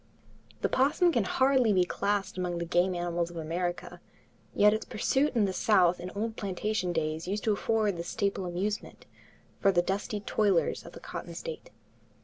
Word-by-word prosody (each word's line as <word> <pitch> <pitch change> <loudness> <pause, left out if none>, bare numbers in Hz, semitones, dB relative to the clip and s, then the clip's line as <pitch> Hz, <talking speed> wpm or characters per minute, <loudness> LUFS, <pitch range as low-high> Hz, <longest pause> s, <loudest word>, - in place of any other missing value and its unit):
The - - +2
opossum 300 +7 +3
can 235 -9 +1
hardly 260 0 +3
be 185 -2 +4
classed 200 +2 -1
among 180 -1 -2
the 170 - -2
game 175 +2 +2
animals 175 -1 -1
of 175 - -10
America, 175 +2 -3 0.5
yet 210 +1 +6
its 220 - -2
pursuit 270 +6 0
in 220 -3 +4
the 190 - -2
South 185 -4 +3
in 180 - -6
old 220 +2 -2
plantation 200 -1 -2
days 160 0 -2
used 205 +3 -2
to 215 - +2
afford 210 -2 0
the 170 - -3
staple 195 0 -2
amusement 195 +4 -4 0.5
for 195 - +4
the 175 -2 +2
dusky 205 +3 -2
toilers 200 -3 +1
of - - -11
the - - -10
cotton - - -7
states. 485 +1 -7
195 Hz, 175 wpm, -29 LUFS, 175-215 Hz, 0.5 s, yet